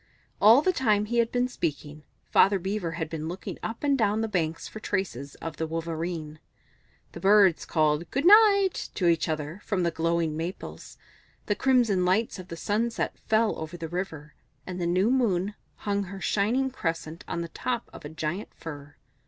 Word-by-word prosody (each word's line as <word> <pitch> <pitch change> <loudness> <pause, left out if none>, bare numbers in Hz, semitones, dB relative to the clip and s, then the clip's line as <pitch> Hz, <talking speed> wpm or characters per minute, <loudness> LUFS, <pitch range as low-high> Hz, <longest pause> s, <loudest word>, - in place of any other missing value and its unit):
All 230 +8 +7
the 370 - +3
time 215 -9 +2
he 235 +2 0
had 230 0 +2
been 250 0 +1
speaking, 155 - -4 0.3
Father 200 0 +5
Beaver 190 -2 -3
had 165 -1 -3
been 155 0 -5
looking 180 +3 -6
up 225 +5 -5
and 285 -1 +3
down 220 -3 +1
the 225 - 0
banks 165 -6 -2
for 215 - -9
traces 165 - -3
of 165 -1 -7
the 160 - -2
Wolverene. 165 -1 -4 0.7
The - - -9
Birds 195 -3 +5
called 155 0 +1
"Good 275 +4 -1
night" 400 -1 +6
to 185 - -1
each 165 -1 +2
other 155 +4 -4
from 190 -4 -1
the 170 - +1
glowing 165 -1 0
maples; 170 +4 -6 0.5
the 205 - +1
crimson 235 -6 +2
lights 195 +3 +1
of 185 - -9
the 165 - -7
sunset 230 +6 -1
fell 220 0 +3
over 160 +2 -6
the 165 -1 -5
river, 160 -4 -5 0.3
and 185 -1 -5
the 170 - 0
new 185 +6 +2
moon 205 -7 +1 0.2
hung 200 -1 -2
her 195 +1 -8
shining 240 +8 +1
crescent 165 -7 -4
on 170 - -3
the 170 - -5
top 240 +6 -3
of - - -11
a 150 - -6
giant 160 +5 -4
fir. 145 -2 -9
185 Hz, 185 wpm, -27 LUFS, 165-220 Hz, 0.7 s, All